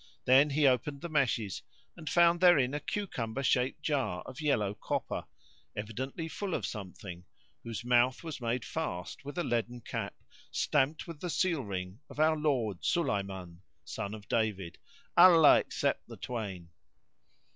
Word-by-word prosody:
Then 135 +4 +6
he 145 +1 +2
opened 140 +2 +2
the 170 - -5
meshes 120 - 0 0.3
and 155 - -6
found 170 0 +4
therein 145 -8 +5
a 145 - -1
cucumber 135 - -3
shaped 130 +3 +1
jar 135 -12 -1
of 140 - -9
yellow 105 -10 +1
copper,[FN#65] - - -3 0.5
evidently 130 +9 -4
full 190 +2 -3
of - - -2
something, 90 -3 -7 0.4
whose 115 0 -6
mouth 125 +3 +3
was 160 -5 -6
made 120 0 -1
fast 90 - -4
with 145 +4 -8
a 175 - +1
leaden 120 -1 -1
cap, - - -4 0.3
stamped 145 +1 +1
with 165 -4 -9
the 180 - -4
seal 170 -3 +1
ring 95 0 -5
of - - -10
our 155 +1 +4
Lord 130 - 0
Sulayman 95 - -1 0.2
son 100 +2 -4
of 105 -2 -12
David 105 -6 -1 0.4
(Allah 170 -4 +8
accept - - -2
the - - -10
twain!). 100 -8 -5
125 Hz, 150 wpm, -31 LUFS, 105-155 Hz, 0.5 s, Allah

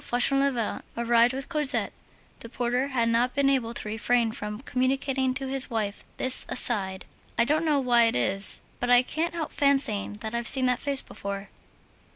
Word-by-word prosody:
Fauchelevent 255 -1 -1 0.2
arrived 235 0 +2
with 270 +1 -5
Cosette, 300 -4 -1 0.5
the 230 - -10
porter 245 +2 -3
had 245 -4 -2
not 235 +3 0
been 280 -1 +1
able 245 -4 -2
to - - -3
refrain 225 +2 -1
from 210 +1 -8
communicating 265 0 -2
to 270 -1 -5
his 265 -1 +2
wife 210 -3 -4
this 260 0 +8
aside: 195 -7 +3 0.3
"I 235 - +2
don't 310 +5 -1
know 300 -3 +1
why 240 -3 +2
it 230 - -1
is, 195 +10 -1 0.2
but 245 - -4
I 245 0 +4
can't 330 +6 -4
help 320 -2 -5
fancying 270 -9 -1
that 220 0 -6
I've 235 -1 -4
seen 260 -1 +6
that 250 -1 0
face 280 -2 +5
before." 200 0 -8
245 Hz, 180 wpm, -24 LUFS, 230-275 Hz, 0.5 s, this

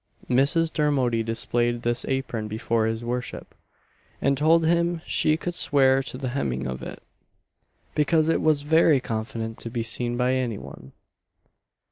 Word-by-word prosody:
Mrs. 160 +6 +2
Dermody 135 -6 +1
displayed 120 +1 -1
this 120 0 +1
apron 130 -5 -2
before 110 +1 -1
his 115 +1 -3
worship, 125 +1 -5 0.7
and 140 0 +2
told 160 +4 +3
him 170 0 +1
she 155 0 +2
could 175 +1 -4
swear 135 -4 +3
to 130 -1 -7
the 130 -1 -3
hemming 65 - -2
of 65 0 -5
it - - -8 0.9
"because 155 +1 +2
it 165 - +1
was 155 -2 +2
very 160 -1 +4
confident 115 -1 -5
to 115 - -5
be 115 0 -3
seen 120 +1 0
by 125 +1 +1
any 125 -5 -1
one." 65 -7 -12
130 Hz, 150 wpm, -25 LUFS, 115-150 Hz, 0.9 s, very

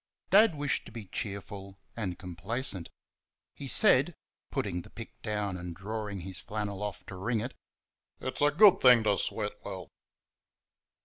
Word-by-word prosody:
Dad 205 -3 +6
wished 145 -1 -1
to - - -11
be 110 -2 -8
cheerful 100 0 -6 0.2
and 95 -6 -3
complacent. 95 +2 -3 0.6
He - - -8
said - - +5 0.3
(putting 90 - -2
the - - -14
pick 115 -1 -10
down 105 -3 -2
and 90 -1 -6
dragging 105 0 -5
his 95 0 -5
flannel 100 0 -4
off 105 -2 -5
to 95 - -8
wring 110 +5 -1
it): 120 +4 -4 0.7
"It's 130 - -5
a 145 - +6
good 190 +5 +7
thing 125 -3 +7
to 105 -2 +3
sweat 105 +1 -3
well." 95 -3 -7
105 Hz, 150 wpm, -30 LUFS, 95-115 Hz, 0.7 s, good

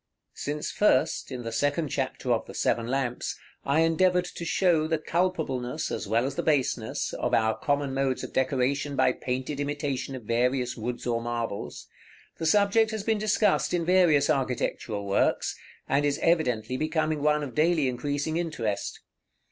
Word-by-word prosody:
§ - - -58
XL. - - -56 0.2
Since 150 +1 -2
first, 160 -8 +2
in 125 -2 -5
the 115 - -4
second 145 +6 0
chapter 130 -2 -2
of 115 - -2
the - - -10
"Seven 115 -1 0
Lamps," 130 -1 -2 0.3
I 145 +4 +2
endeavored 180 +2 +3
to 175 - -7
show 170 -2 +2
the 160 0 +1
culpableness, 155 -5 -1
as - - -3
well 115 +4 +2
as 135 - -2
the - - -2
baseness, 130 -7 0
of - - 0
our 110 0 +2
common 145 -2 -1
modes 135 -1 0
of - - -7
decoration 135 +2 0
by - - +4
painted 130 +3 -3
imitation 140 -2 -2
of 125 - -8
various 125 +3 0
woods 120 +1 -4
or 115 -1 0
marbles, 115 -3 -4 0.5
the 160 - 0
subject 205 +4 +4
has 220 -2 -4
been 220 -1 +1
discussed 210 -3 +2
in 170 -1 -1
various 170 -6 +4
architectural 120 -5 -1
works, 100 0 +1 0.3
and 140 +1 +2
is 145 -1 +1
evidently 125 -8 +1
becoming 155 0 0
one 150 0 +2
of 135 -4 -6
daily 155 -2 +2
increasing 145 +5 -2
interest. 120 -12 -3
140 Hz, 170 wpm, -27 LUFS, 125-160 Hz, 0.5 s, by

